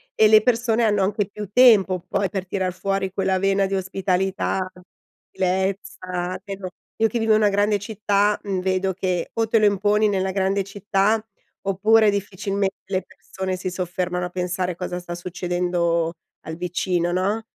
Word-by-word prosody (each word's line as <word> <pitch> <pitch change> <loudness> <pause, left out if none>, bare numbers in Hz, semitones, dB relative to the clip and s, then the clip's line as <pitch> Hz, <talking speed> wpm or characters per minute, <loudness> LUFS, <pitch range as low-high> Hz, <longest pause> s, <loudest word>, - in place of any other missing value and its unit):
e 215 - +6
le 215 0 +7
persone 235 0 +1
hanno 205 -3 +2
anche 205 +1 0
più 210 0 -7
tempo 210 -7 +6
poi 200 - 0
per 190 -2 -4
tirar 185 -1 -2
fuori 195 0 -2
quella 190 -1 +1
vena 195 +1 +2
di 195 - -2
ospitalità, 190 0 -1 0.6
gentilezza 185 -1 -2
che 200 -1 -5
non 185 -2 -6 0.3
io 225 - +4
che 235 +2 -2
vivo 225 -1 +3
in - - +5
una 210 - +4
grande 205 +1 +2
città, 205 0 0
mhmm, 195 -2 -2
vedo 190 0 0
che 180 -2 -2
o 225 0 0
te 225 +1 +3
lo 215 - +4
imponi 205 +2 +2
nella 190 -1 0
grande 195 +1 0
città, 205 +2 0 0.4
oppure 215 +3 +4
difficilmente 200 0 -2
le 190 -2 -2
persone 190 0 -6
si 185 0 -3
soffermano 180 0 -2
a - - -5
pensare 180 0 -2
cosa 180 0 -4
sta 175 -1 -6
succedendo 175 -1 -1 0.3
al 160 - -5
vicino, 175 0 -1
no? 200 +5 0
190 Hz, 165 wpm, -23 LUFS, 185-205 Hz, 0.6 s, le